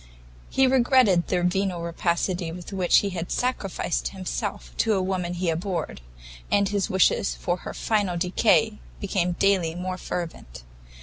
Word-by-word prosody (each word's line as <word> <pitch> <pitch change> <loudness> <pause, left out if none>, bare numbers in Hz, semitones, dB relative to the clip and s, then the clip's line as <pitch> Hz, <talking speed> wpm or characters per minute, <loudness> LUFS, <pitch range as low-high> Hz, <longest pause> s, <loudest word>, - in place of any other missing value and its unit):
He 265 - +3
regretted 250 -8 +4
the 180 -1 0
venal 180 -1 0
rapacity 170 +1 -1
with 180 +3 -8
which 185 -2 +4
he 200 - -2
had 175 -1 -5
sacrificed 195 - -1
himself - - -5
to 220 - +2
a - - +1
woman 180 -2 -2
he 175 -1 0
abhorred, 170 - -3 0.5
and 200 -1 +3
his 200 -1 -1
wishes 190 +1 +2
for 175 0 -2
her - - -8
final 205 -5 0
decay 210 +4 +2 0.2
became 180 -3 0
daily 180 -3 +2
more 185 +1 -4
fervent. 160 - -6
180 Hz, 145 wpm, -25 LUFS, 170-200 Hz, 0.5 s, regretted